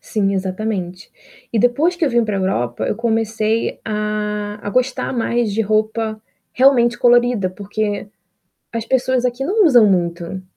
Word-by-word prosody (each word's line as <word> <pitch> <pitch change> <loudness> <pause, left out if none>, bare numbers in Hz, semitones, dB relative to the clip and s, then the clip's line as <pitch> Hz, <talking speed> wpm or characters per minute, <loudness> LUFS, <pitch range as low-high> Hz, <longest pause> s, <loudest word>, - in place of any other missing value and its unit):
sim, 200 -2 -1
exatamente. 190 -1 -4 0.4
E 230 - +1
depois 260 - +2
que 340 - 0
eu 285 - +1
vim 235 -1 +2
para 210 -2 -2
a - - -1
Europa, 120 -10 -1
eu - - -1
comecei 225 -1 -1
a 210 -1 -2 0.2
a 205 - -5
gostar 255 +4 0
mais 235 -2 0
de 215 - -1
roupa, 215 +1 -1 0.3
realmente, 245 -2 +4
colorida, 240 -4 +3
porque 205 +2 -4 0.6
as 230 -1 -4
pessoas 260 0 +1
aqui 250 +2 -1
não 410 +4 +3
usam 240 -9 +6
muito. 175 0 -2
220 Hz, 155 wpm, -19 LUFS, 200-240 Hz, 0.6 s, usam